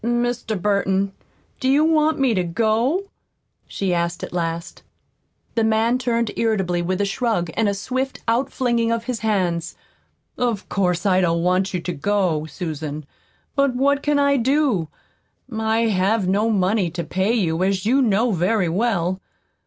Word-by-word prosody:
"Mr. 240 -2 -1
Burton, 195 0 +1 0.5
do 260 - 0
you 285 +3 +4
want 315 -1 +3
me 265 -4 +2
to 185 -3 +1
go?" 225 - +1 0.6
she 190 -2 -2
asked 170 0 -1
at - - -6
last. 170 -1 -3 0.7
The 225 - +1
man 225 +3 +2
turned 235 -3 0
irritably, 190 -6 0
with 185 +3 -1
a - - +2
shrug, 200 -5 -1
and 225 -2 +1
a 200 - -1
swift 260 +6 -3
outflinging 235 -1 +1
of 230 0 -1
his 250 -2 -3
hands. 180 -6 -1 0.6
"Of 235 -5 -1
course, 180 -1 0
I 190 -1 +4
don't 170 -1 +1
want 185 +2 +1
you - - 0
to 180 - -3
go, 170 -2 0
Susan. 155 -3 -5 0.5
But 275 -2 +2
what 280 +2 +2
can 295 0 +1
I 280 0 +3
do? 260 - +1 0.7
I 220 +1 +1
have 195 +1 +1
no 205 +4 +2
money 195 -2 +1
to 170 +1 -4
pay 190 +6 0
you, 175 -7 0
as 190 0 0
you 260 +5 +3
know 225 0 +2
very 185 +1 +1
well. 185 -2 0
205 Hz, 160 wpm, -21 LUFS, 180-240 Hz, 0.7 s, you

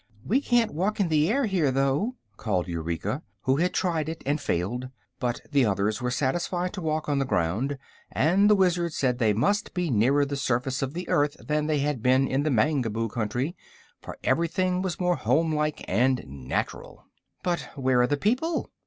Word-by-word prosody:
"We 260 +7 +2
can't 240 - +2
walk 190 +8 -1
in 190 -4 +2
the 155 +1 +3
air 270 +4 +2
here, 185 -9 +1
though," 135 - +1 0.2
called 95 -5 -1
Eureka, 85 - -3 0.2
who 130 +1 +2
had 180 +3 +1
tried 160 -4 0
it 165 0 -6
and 145 +2 0
failed; 120 +6 -2 0.3
but 120 -1 -2
the 140 -2 +4
others 105 +1 0
were 125 - 0
satisfied 175 +7 -1
to 195 - -5
walk 155 -1 -1
on 145 -2 +1
the - - +2
ground, 120 +7 -1 0.3
and 190 +8 +3
the 210 - +6
Wizard 175 -3 +1
said 125 -4 0
they 110 -3 +3
must 190 - 0
be 175 -4 0
nearer 130 +6 +3
the 140 0 -3
surface 130 0 -1
of 135 +3 -3
the 180 - -4
earth 145 0 +1
than 150 0 -1
they 150 -2 +1
had 145 -4 -1
been 130 +3 +3
in 135 +2 0
the 155 - 0
Mangaboo 115 -4 +1
country, 120 - -2 0.5
for - - -9
everything 180 +2 +1
was 185 -3 -3
more 180 -1 +1
homelike 150 +4 0
and 125 +6 +2
natural. 65 -2 -5 0.4
"But 175 -1 -1
where 130 -3 +2
are 125 - +3
the 145 - 0
people?" 255 - 0
145 Hz, 190 wpm, -26 LUFS, 125-175 Hz, 0.5 s, the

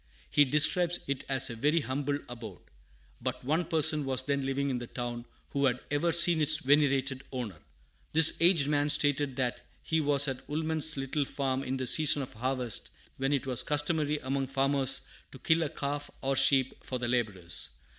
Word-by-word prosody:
He 145 - +5
describes 165 +5 +3
it 140 -1 -3
as 135 -2 +1
a - - -7
very 150 +8 +1
"humble 140 +1 -3
abode." 115 -6 -10 0.6
But - - -5
one 160 +5 0
person 155 -2 +2
was 130 -1 -2
then 140 0 -2
living 135 +1 -2
in 125 - -3
the 120 - -8
town 120 -1 -6 0.3
who 140 0 0
had 125 -2 0
ever 145 +4 +1
seen 170 -1 +3
its 155 +1 +4
venerated 140 -2 +1
owner. 120 - -6 0.5
This 160 +1 +7
aged 170 -4 +4
man 145 0 0
stated 145 -2 +2
that 125 -2 -2 0.2
he 160 0 0
was 145 -1 +2
at 130 -2 -6
Woolman's 155 0 0
little 135 +2 -2
farm 135 -1 -3
in 135 -1 -4
the 130 - -3
season 145 +1 +4
of 130 - -10
harvest 125 0 -1 0.3
when 135 +1 -1
it 140 -3 -1
was 130 -3 +1
customary 150 0 0
among 135 0 -2
farmers 135 0 +1 0.3
to - - -10
kill 160 +5 +1
a 155 - -1
calf 145 +1 -5
or 135 0 0
sheep 130 -1 +2
for 130 - -4
the 120 -1 -4
laborers. 105 -8 -1
140 Hz, 185 wpm, -29 LUFS, 130-150 Hz, 0.6 s, This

